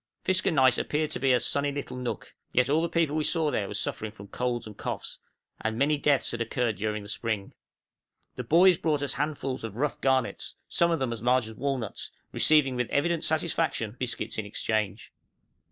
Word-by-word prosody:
Fiskernaes 160 -9 +3
appeared 155 +1 -1
to - - -2
be 135 +1 +3
a 125 - +5
sunny 140 +4 +1
little 140 -2 -5
nook, 125 -1 -5 0.2
yet 125 +2 +3
all 155 +2 +4
the 170 - 0
people 160 -3 +1
we 155 - +1
saw 160 -1 +1
there 100 - -1
were 100 - -6
suffering 105 0 -2
from 100 -2 -12
colds 120 0 -2
and 105 -2 -9
coughs, - - -4 0.4
and 110 0 -2
many 145 +4 +3
deaths 145 -1 +2
had 120 - -3
occurred 115 -2 0
during 105 +1 -2
the - - -9
spring. 110 -3 -3 0.8
The 125 - -4
boys 175 +7 +5
brought 150 -3 +1
us 140 - 0
handfuls 140 -3 -2
of 110 -3 -5
rough 145 +4 -1
garnets, 130 -2 0
some 170 - +2
of 165 - +2
them 130 -4 -1
as 115 - -7
large 125 -1 +3
as 110 - -8
walnuts, 130 -3 -3 0.2
receiving 150 -4 +4
with 125 -1 -1
evident 165 +3 +1
satisfaction 155 -8 0
biscuits 125 -3 -3
in 110 - -3
exchange. 105 -1 -2
130 Hz, 195 wpm, -28 LUFS, 115-150 Hz, 0.8 s, a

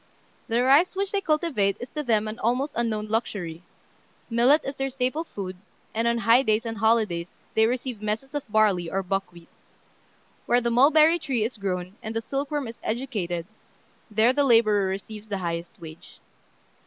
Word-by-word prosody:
The 235 +2 +1
rice 285 +9 +4
which 395 0 -1
they 400 - 0
cultivate 305 - +1
is 245 - -6
to 300 - -4
them 220 -6 +1
an 215 +2 -6
almost 250 +6 0
unknown 225 -2 -1
luxury: 200 -7 -3 0.7
millet 250 +7 +4
is 275 - -3
their 270 -1 -2
staple 260 +4 -1
food, 190 - -7 0.4
and 230 +1 0
on 235 0 +2
high 230 +2 +5
days 220 -2 +1
and 225 -2 -4
holidays 215 -6 +1 0.2
they 220 0 +4
receive 245 -2 -3
messes 215 +6 -3
of 290 - -1
barley 205 -6 +3
or 195 +2 -1
buckwheat. 180 -3 -4 1.0
Where 240 - +4
the 235 -1 -1
mulberry 310 +7 +5
tree 265 -8 -1
is 230 +3 -3
grown, 185 0 -4
and 220 +1 -6
the 225 - 0
silkworm 280 +1 -3
is 230 - -9
"educated," 210 -9 -3 0.6
there 220 +3 +3
the 285 +1 +2
labourer 215 -6 +4
receives 205 +3 -6
the 205 -2 -3
highest 170 -1 -5
wage. 160 -1 -12
225 Hz, 170 wpm, -25 LUFS, 200-265 Hz, 1.0 s, high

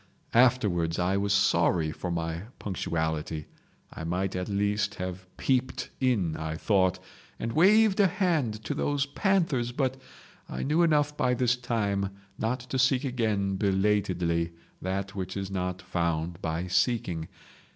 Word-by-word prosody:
Afterwards 105 -10 +3
I 90 +2 +1
was 100 0 0
sorry 85 -5 +3
for 90 - -5
my 85 +1 -3
punctuality—I 80 -4 -4
might 90 +3 -1
at 90 +1 -3
least 105 0 0
have 90 0 -5
peeped 130 -1 0
in 105 -12 +1
I 80 0 -3
thought, 95 +1 +2 0.4
and 115 0 -3
waved 210 +5 +5
a 200 - +6
hand 155 - 0
to 145 - -2
those 145 -1 0
panthers, 145 - +1
but 130 0 -1 0.5
I - - -4
knew 150 +5 +2
enough 150 -3 +3
by 125 -3 +2
this 125 0 +2
time 105 -6 -1 0.3
not 120 +3 -1
to 130 +2 -3
seek 130 0 +3
again 110 -7 0
belatedly 95 -4 +1 0.3
that 95 +1 -3
which 95 -1 -4
is 95 0 -4
not 90 -1 -3
found 85 -2 -2
by 80 +2 -2
seeking. 90 -4 0
100 Hz, 140 wpm, -28 LUFS, 90-125 Hz, 0.5 s, a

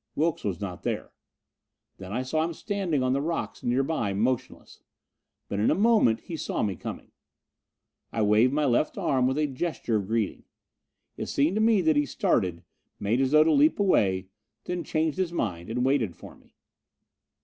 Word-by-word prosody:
Wilks 160 +1 0
was 100 -3 -2
not 95 -4 -6
there. - - -3 0.9
Then 95 0 -8
I 125 +4 -1
saw 155 +5 0
him 165 0 -3
standing 190 -10 -1
on 130 0 +1
the 140 - 0
rocks 165 +3 -3
nearby, 125 -4 0
motionless. 120 +4 -2 0.7
But 100 - -3
in 105 - +3
a - - +3
moment 210 - +3
he 170 - -7
saw - - -2
me 100 -3 -1
coming. - - -8 1.0
I 110 - 0
waved 105 +4 +4
my 150 +1 +1
left 125 +3 +1
arm 130 -2 +1
with 130 +2 0
a 155 - +2
gesture 135 -5 -2
of 100 -2 -4
greeting. 110 -2 -2 0.7
It - - -4
seemed 145 +5 +1
to - - +2
me 220 -3 +4
that 160 -3 +3
he 145 -1 +2
started, 90 -8 0 0.4
made 110 +6 +1
as 135 - +2
though 155 +2 +6
to 160 - +2
leap 300 -1 +4
away, 95 - +2 0.3
then 180 -1 -3
changed 160 +2 -1
his 185 -3 0
mind 90 - -3
and 125 +2 -1
waited 125 - +1
for - - -12
me. - - -26
130 Hz, 180 wpm, -27 LUFS, 110-160 Hz, 1.0 s, though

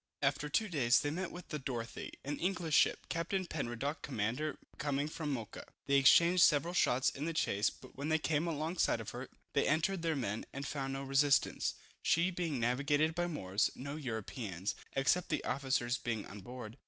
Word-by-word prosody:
After 140 +2 +1
two 215 +8 +2
days 135 - +3
they 145 - -1
met 180 +3 -3
with 180 - -10
the 150 - -3
Dorothy, 125 -3 -5
an 145 +1 -3
English 175 -3 -1
ship, - - +4
Captain 185 +3 -1
Penruddock, 140 -1 -3
commander, 130 +5 -2 0.2
coming 145 0 0
from 155 -1 -4
Mocha. 115 -5 -5 0.2
They 140 0 +4
exchanged 170 +6 +6
several 150 +4 +5
shots 130 -7 +3
in 140 - -5
the 165 - -1
chase, 100 -9 +2
but 130 - -15
when 140 +3 -3
they 160 - +4
came 155 +1 0
along 165 +2 -2
side - - +3
of 110 -1 -6
her, 125 +2 -7 0.2
they 140 - +2
entered 165 +5 +1
their 165 -1 0
men, 110 -5 -3
and 140 +1 -4
found 135 -1 -3
no 135 0 -3
resistance, 135 0 +2 0.3
she 170 +3 +3
being 170 -6 -2
navigated 140 +6 +2
by 175 +1 0
Moors, 100 - 0
no 140 +3 -5
Europeans, 110 - -4 0.2
except 140 +6 +2
the - - -1
officers 130 -2 0
being 115 -3 -2
on 100 +2 -9
board. 120 +2 -8
140 Hz, 190 wpm, -34 LUFS, 125-160 Hz, 0.3 s, exchanged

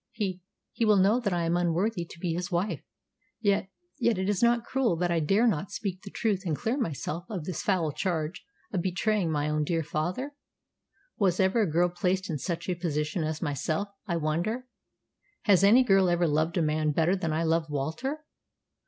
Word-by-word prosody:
He 190 -5 -3 0.3
he - - -2
will 215 -2 +5
know 200 +6 +4
that 220 -5 -1
I 175 -1 0
am 165 +1 +1
unworthy 175 +3 0
to 165 - -13
be 170 -1 -1
his 180 +3 -3
wife. 175 -3 -1 0.6
Yet 200 -3 +1 0.3
yet 235 -3 +2
is 190 +1 0
it - - +6
not 235 -1 +2
cruel 260 -9 +1
that 175 +1 0
I 170 - +2
dare 195 +9 +3
not 190 -5 +1
speak 190 -3 -4
the 200 - -9
truth 205 -2 0
and 165 -5 -1
clear 225 - -1
myself 170 - -3
of 190 -7 -4
this 185 - -3
foul 175 -6 +1
charge 165 0 -2 0.3
of 185 - +1
betraying 190 0 0
my 150 -1 0
own 150 0 +1
dear 165 +1 0
father? 180 - -3 0.9
Was 185 -4 +2
ever 190 +4 +3
a 195 -7 +1
girl 175 +3 +3
placed 180 +1 -1
in 150 - -2
such 170 +1 -3
a 185 - +1
position 160 -1 -2
as 155 +1 -3
myself, 155 +6 -1 0.2
I 170 -3 0
wonder. 170 +11 -1 0.8
Has 195 -3 +5
any 230 +6 +7
girl 195 -5 +4
ever 175 0 +2
loved 155 +3 +1
a 170 - +3
man 155 0 +1
better 165 +5 +2
than 175 -4 -2
I 160 +2 0
love 165 -1 +1
Walter?" 160 - -3
180 Hz, 200 wpm, -28 LUFS, 160-200 Hz, 0.9 s, any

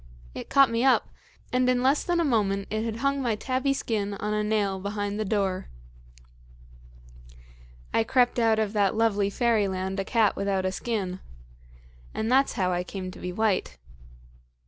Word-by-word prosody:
It - - -8
caught 275 -4 +5
me 230 +1 0
up, 265 -1 +3 0.4
and 250 0 +3
in 250 0 +2
less 275 +3 +3
than 350 -1 0
a 335 - +2
moment 200 -6 0
it 215 +1 -1
had 225 -1 -3
hung 275 0 +1
my 235 -4 0
tabby 260 +5 -1
skin 210 -6 -2
on 210 +1 -3
a 210 0 0
nail 205 -3 0
behind 205 +1 -3
the 215 - -1
door. 195 -3 -1 2.2
"I 225 - +3
crept 245 +1 +2
out 225 -1 +3
of 215 -1 -1
that 205 -2 +2
lovely 210 -3 +2
fairyland 195 -4 0
a - - 0
cat 220 0 +2
without 195 -1 -1
a 185 - 0
skin. 190 -3 -3 1.0
And 220 +2 -1
that's 270 +2 +3
how 185 -1 0
I 175 0 -1
came 185 0 -6
to - - -12
be 180 - -4
white." 190 - 0
215 Hz, 170 wpm, -26 LUFS, 195-240 Hz, 2.2 s, caught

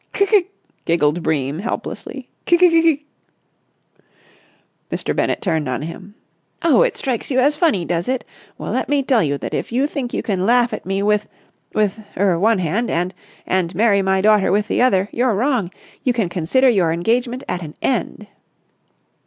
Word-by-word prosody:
"C'k!" 400 -2 +3 0.4
giggled 165 0 +1
Bream 150 -1 -1
helplessly. 225 +5 -5 0.2
"C'k, 345 - +5
c'k, 360 0 +6
c'k!" 300 -3 +2 1.9
Mr. - - -2
Bennett - - -1
turned 160 -7 0
on 125 +2 -3
him. 185 +5 -9 0.5
"Oh, 320 -7 +4
it - - +1
strikes 250 -4 -3
you 260 - 0
as 285 +3 +3
funny, 295 - +1
does 170 0 -2
it? 255 -1 -1 0.3
Well, - - -5
let - - -2
me 285 -1 +2
tell 255 -4 +3
you 145 -2 0
that - - -6
if - - -3
you 255 +4 +1
think 275 -4 -4
you - - -3
can 190 -4 -1
laugh 240 +2 +3
at 210 - -6
me 195 +1 -1
with—with—er—with 205 -2 -2
one 220 +1 +4
hand 190 +7 -1
and—and—marry 185 +3 -1
my 190 0 +1
daughter 210 -2 +4
with 205 +2 +1
the - - +1
other, 195 -6 +3
you're 240 -2 +1
wrong! 235 -4 0 0.3
You 250 - +2
can 225 -7 -1
consider 180 +11 +2
your 190 -9 +3
engagement 240 +9 -1
at 180 - -3
an 155 -3 -8
end." 230 -4 -1
210 Hz, 165 wpm, -19 LUFS, 175-250 Hz, 1.9 s, c'k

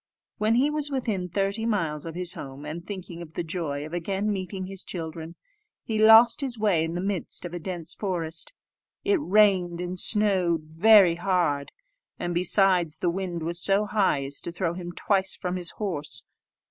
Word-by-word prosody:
When 215 +2 +2
he 275 +5 +3
was 300 -1 0
within 220 -10 -2
thirty 200 +4 -1
miles 165 -9 -1
of 165 - -7
his 180 -1 0
home, 135 +1 -9
and 160 +3 -6
thinking 185 -3 -8
of 160 -2 -10
the 175 - -3
joy 155 -4 -4
of 155 - -10
again 195 +4 -1
meeting 190 0 -5
his 190 0 -7
children, 165 -1 -6 0.5
he 220 -1 -2
lost 225 +4 +7
his 260 -4 -3
way 200 -7 +2
in 165 +1 -3
the 180 - -2
midst 195 -3 -2
of 175 - -7
a 175 - -4
dense 175 -1 -3
forest. 170 -5 -2 0.5
It 400 -3 +2
rained 190 -6 +3
and 180 +1 -4
snowed 185 -7 +2
very 175 +2 +5
hard, 175 -6 0 0.5
and, 175 0 -3
besides, 180 -2 +3
the 175 - 0
wind 175 -2 -4
was 170 +2 -1
so 200 +2 +3
high 195 -10 +1
as 140 +1 -4
to - - -5
throw 170 -1 -2
him 175 0 -6
twice 190 +1 +1
from 180 0 -4
his 180 -2 -3
horse. 175 -9 -4
180 Hz, 185 wpm, -26 LUFS, 170-205 Hz, 0.5 s, lost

